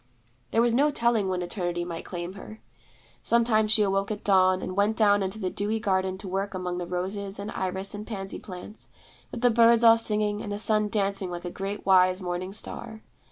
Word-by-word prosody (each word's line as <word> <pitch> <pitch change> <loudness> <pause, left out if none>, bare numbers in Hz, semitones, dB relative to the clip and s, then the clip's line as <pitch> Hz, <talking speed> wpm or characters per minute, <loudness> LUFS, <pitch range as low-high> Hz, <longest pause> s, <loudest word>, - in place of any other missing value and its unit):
There 230 - +2
was 240 -1 +2
no 285 +5 +4
telling 235 -7 +1
when 180 -1 -1
Eternity 175 -1 -3
might 170 -1 -6
claim 175 0 -5
her. 215 +2 -11 0.6
Sometimes 230 -2 +2
she 215 0 +4
awoke 195 0 0
at 210 -1 -5
dawn, 185 -2 +4
and 185 - -5
went 205 +2 +1
down 205 -2 +4
into 190 +2 -3
the 185 -4 -3
dewy 210 +2 -2
garden 190 -2 0
to 190 - -9
work 195 +1 -3
among 180 -1 -3
the 175 - -4
roses 195 +3 -4
and 200 +2 -5
iris 190 +1 -3
and 210 +1 -7
pansy 195 -4 -6
plants, 190 +2 -10 0.4
with 240 - -6
the 245 -1 +4
birds 230 0 +5
all 230 0 +7
singing 210 -1 -1
and 205 - -6
the 205 - -2
sun 215 0 +1
dancing 200 -2 -1
like 175 0 -6
a 175 - -4
great 200 +2 -5
wise 185 -1 +4
morning 180 0 -4
star. 220 +2 -4
200 Hz, 205 wpm, -26 LUFS, 185-215 Hz, 0.6 s, all